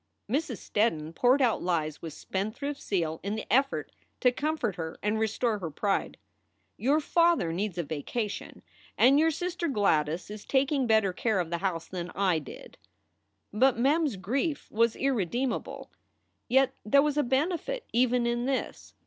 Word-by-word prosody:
Mrs. 265 0 -1
Steddon 165 -7 -1
poured 255 +9 +3
out 235 -3 +2
lies 155 -4 -1
with 165 -3 -6
spendthrift 220 - -4
zeal 165 -5 -1
in 200 +2 -3
the 220 - -5
effort 275 +2 +1 0.3
to 250 - +5
comfort 275 - -1
her 160 -1 -5
and 210 +1 +1
restore 220 0 0
her 170 -4 -4
pride. 195 +6 -1 0.3
" - - -46
Your 280 +7 +2
father 335 - +2
needs 190 0 -2
a 175 - 0
vacation, 195 +9 -4 0.3
and 270 +4 +6
your 320 +1 +4
sister 350 +2 -2
Gladys 175 - +1
Is 210 -1 -8
taking 270 -1 +1
better 220 -4 +3
care 215 +1 0
of 170 -2 -2
the 170 - -1
house 175 -3 -2
than 180 -1 -5
I 185 -4 +2
did." 145 - -12 0.7
But 250 +3 +3
Mem 290 +7 +3
s 255 - -4
grief 265 - -2
was 230 +1 +2
irredeemable. 250 -1 -2 0.6
Yet 265 +2 +3
there 280 +6 +4
was 300 -1 0
a 295 - +3
benefit 330 - -1
even 245 0 +3
in 240 0 0
this. 270 -1 -3
230 Hz, 165 wpm, -28 LUFS, 185-275 Hz, 0.7 s, and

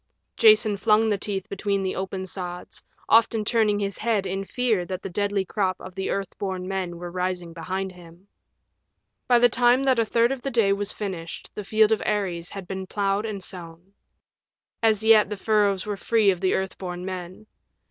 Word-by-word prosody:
Jason 430 - +5
flung 215 +2 +3
the 205 - +1
teeth 195 -1 -3
between 200 0 -1
the 190 - -2
open 190 0 -4
sods, 180 -1 -6 0.2
often 225 -1 +4
turning 215 -2 +2
his 200 -1 -3
head 215 -4 0
in 195 +1 -2
fear 225 -3 0
that 185 +1 -6
the 195 - -5
deadly 200 +1 0
crop 185 -1 -1
of 185 - -10
the 190 +1 -3
Earth 195 -2 -3
born 185 -2 -3
Men 185 -3 -3
were 175 0 -7
rising 180 -1 -3
behind 185 +4 -4
him. 175 +1 -16 1.0
By 245 - +5
the 245 +1 +6
time 245 +2 +3
that 260 -3 +3
a - - +4
third 235 +3 +2
of 270 -2 -3
the 275 - -3
day 225 -6 +3
was 200 0 -2
finished 180 -5 -6
the 210 - -6
field 215 +2 +3
of 220 - +2
Ares 185 -5 -2
had 195 -3 -8
been 190 0 -5
plowed 200 +2 0
and 200 -3 -5
sown. 175 +1 -8 0.9
As 220 -2 +3
yet 220 -2 +6
the 210 - -4
furrows 205 -2 +1
were 205 -1 -3
free 215 -1 +3
of 180 -1 -4
the 185 - +2
Earth 190 0 -3
born 180 -1 -5
Men. 185 +2 -7
195 Hz, 195 wpm, -25 LUFS, 185-215 Hz, 1.0 s, the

